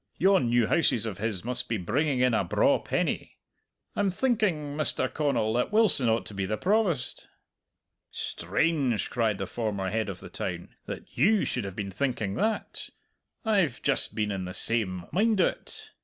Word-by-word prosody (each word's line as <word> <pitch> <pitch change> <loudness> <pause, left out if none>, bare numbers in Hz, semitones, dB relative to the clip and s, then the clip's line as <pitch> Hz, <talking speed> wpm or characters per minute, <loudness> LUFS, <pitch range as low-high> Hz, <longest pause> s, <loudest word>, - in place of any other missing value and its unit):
Yon 190 -10 +3
new 120 -1 +3
houses 120 -5 +2
of 105 -4 -5
his 110 -3 -1
must 125 0 -2
be 115 - 0
bringing 130 - 0
in 125 -1 +3
a 110 - +2
braw 85 - +3
penny. - - -2 0.6
I'm 205 -1 +2
thinking, 185 - 0
Mr. 150 -3 +1
Connal, 140 -7 0
that 125 +9 0
Wilson 210 - +5
ought 115 +1 +1
to - - -6
be 100 -1 -2
the 110 +2 -1
Provost!" 190 - 0 0.8
"Strange!" 125 - -1
cried 110 -4 +1
the 95 - -3
former 100 -2 -3
Head 110 -1 -1
of 95 -2 -6
the - - -10
Town, - - -5 0.2
"that - - -8
you 215 +1 +4
should 120 -5 -2
have 95 -2 -6
been 100 -2 -4
thinking 110 -2 -1
that! 215 - -2 0.6
I've 195 - +2
just - - +1
been 105 -1 0
in 95 -2 -3
the 90 - -6
same 95 -6 0
mind 215 +2 +2
o't. 180 - -2
120 Hz, 170 wpm, -28 LUFS, 105-165 Hz, 0.8 s, Wilson